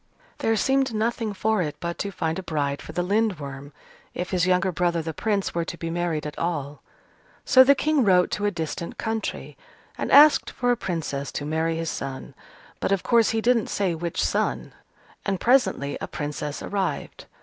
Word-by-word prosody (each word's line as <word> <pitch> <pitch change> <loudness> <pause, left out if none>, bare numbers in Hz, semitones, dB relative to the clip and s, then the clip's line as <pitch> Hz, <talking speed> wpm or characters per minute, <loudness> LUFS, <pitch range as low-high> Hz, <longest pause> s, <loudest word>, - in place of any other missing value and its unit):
There 225 - +1
seemed 265 +2 +1
nothing 225 0 -1
for 215 +1 0
it 150 -3 -3
but 170 0 -4
to 200 - -2
find 160 -2 -2
a - - -3
bride 145 -5 -2
for - - -9
the 175 +2 -1
Lindworm, 155 -9 -1 0.4
if 180 - -4
his 185 -1 +1
younger 185 0 +2
brother, 170 -1 0
the 160 0 -4
Prince, 205 +2 -1
were 170 - 0
to 170 - -6
be 165 0 -4
married 170 -3 -1
at 150 - -6
all. 150 -4 -3 0.6
So 260 - +8
the 280 +2 +5
King 300 -1 +2
wrote 180 -3 +4
to 205 0 0
a - - +3
distant 170 -2 -5
country, 220 -1 -3 0.4
and - - -2
asked 295 +2 +7
for 245 -1 0
a - - +3
Princess 160 -9 -3
to 145 - -4
marry 160 +2 0
his 165 0 -2
son 135 -1 -6 0.5
(but, - - -1
of 195 -2 +1
course, 230 -2 +4
he 225 0 0
didn't 235 -2 +2
say 195 -4 0
which 170 +1 -2
son), - - -1 0.5
and 195 -2 -1
presently 240 - +2
a - - -3
Princess 150 0 -5
arrived. 195 -2 -3
180 Hz, 190 wpm, -25 LUFS, 160-220 Hz, 0.6 s, So